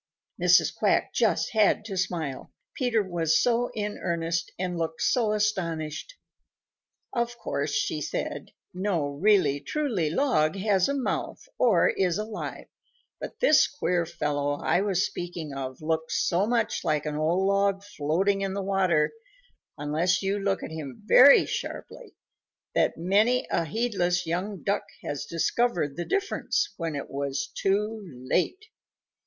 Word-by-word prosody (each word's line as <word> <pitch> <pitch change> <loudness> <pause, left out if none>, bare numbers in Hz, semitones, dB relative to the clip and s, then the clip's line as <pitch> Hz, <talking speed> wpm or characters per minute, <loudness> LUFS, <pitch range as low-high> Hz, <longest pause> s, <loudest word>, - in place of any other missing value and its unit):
Mrs. - - +5
Quack - - +1
just - - +1
had 215 -1 +3
to 200 -3 -5
smile, 165 -7 -3 0.2
Peter 245 -8 +1
was 170 -4 +1
so 245 0 +2
in 210 -1 -3
earnest 170 -1 -2
and 180 -1 -2
looked 165 -1 -3
so 230 -4 +2
astonished. 190 - -2 1.0
"Of 240 0 -1
course," - - -1 0.2
said - - -4
she, - - -25 0.2
"no 180 -4 -1
really 150 -2 +3
truly 210 - -1
log 160 - +2
has 195 +1 +2
a 280 - 0
mouth 275 - -3
or 220 -9 +4
is 180 -3 +1
alive, 215 0 -5 0.5
but - - -8
this 310 -12 +6
queer 180 - -1
fellow 145 -3 -1
I 160 +5 +1
was 195 -2 +1
speaking 170 -4 -6
of 135 +1 -6
looks 160 0 0
so 185 +3 +2
much 230 -2 0
like 150 -1 0
an 150 -1 -3
old 165 +5 +1
log 200 0 +1
floating 195 +2 0
in 195 -1 -2
the 200 - -2
water 185 -5 +2 0.7
unless 170 +5 0
you 195 +1 0
look 195 -1 -1
at - - -6
him 155 +1 -7
very 270 +5 +8
sharply, - - -6 0.6
that - - +1
many 210 +8 +2
a 165 - +1
heedless 180 -2 0
young 180 +4 -3
Duck 200 - 0 0.2
has 145 -2 -4
discovered 170 - 0
the 175 - -4
difference 410 +1 -1
when 165 -3 -3
it 140 - -6
was 140 0 -3
too 210 +3 0 0.3
late. 370 - 0
185 Hz, 145 wpm, -27 LUFS, 160-215 Hz, 1.0 s, very